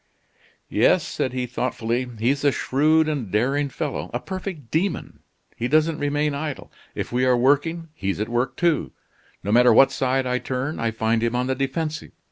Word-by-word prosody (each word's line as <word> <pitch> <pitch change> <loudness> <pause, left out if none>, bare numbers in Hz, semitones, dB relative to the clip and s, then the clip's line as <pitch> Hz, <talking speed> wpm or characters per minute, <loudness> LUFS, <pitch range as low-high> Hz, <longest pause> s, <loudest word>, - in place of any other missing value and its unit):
"Yes," - - +3
said 130 - -2
he 125 0 -2
thoughtfully, 125 0 -2
"he's 130 +6 0
a 145 - +4
shrewd 155 +5 +2
and 140 -9 -2
daring 135 +8 +1
fellow - - -4
a - - 0
perfect 185 - -6
demon. 180 +4 -1 0.4
He 120 - -2
doesn't 155 +3 +2
remain 145 +1 0
idle. 145 0 -5 0.2
If - - -4
we 125 +1 +1
are 130 -1 +4
working, 145 +6 +1
he's 100 -9 -3
at 105 - -1
work 120 +2 -1
too. 170 -3 +1 0.5
No 105 - -2
matter 125 +2 +6
what 135 +4 +6
side 130 0 0
I 125 0 0
turn, 130 +5 -3
I 115 - 0
find 110 0 0
him 115 +1 0
on 125 0 +1
the 130 - 0
defensive. 150 +4 -3
135 Hz, 180 wpm, -23 LUFS, 120-150 Hz, 0.5 s, matter